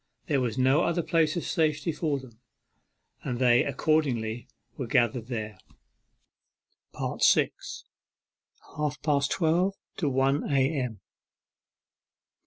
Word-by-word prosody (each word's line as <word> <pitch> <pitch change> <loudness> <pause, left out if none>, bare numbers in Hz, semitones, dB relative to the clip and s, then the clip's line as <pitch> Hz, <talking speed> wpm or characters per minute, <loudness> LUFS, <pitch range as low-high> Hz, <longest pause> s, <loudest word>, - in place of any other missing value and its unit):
There 140 -4 +1
was 120 -2 -2
no 130 +3 +4
other 170 0 0
place 160 -2 +2
of 170 - -2
safety 155 0 0
for 150 -2 -1
them, 125 -4 -13 0.8
and 120 - -3
they 120 -1 +4
accordingly 125 -6 0 0.3
were 130 - -4
gathered 120 0 +1
there. 110 -5 -5 1.6
6. - - +2 0.9
HALF 150 -2 -2
PAST 145 -2 +2
TWELVE 180 +3 +1 0.2
TO 155 -6 0
ONE 135 +2 +1
A.M. 135 - 0
135 Hz, 105 wpm, -27 LUFS, 120-155 Hz, 1.6 s, no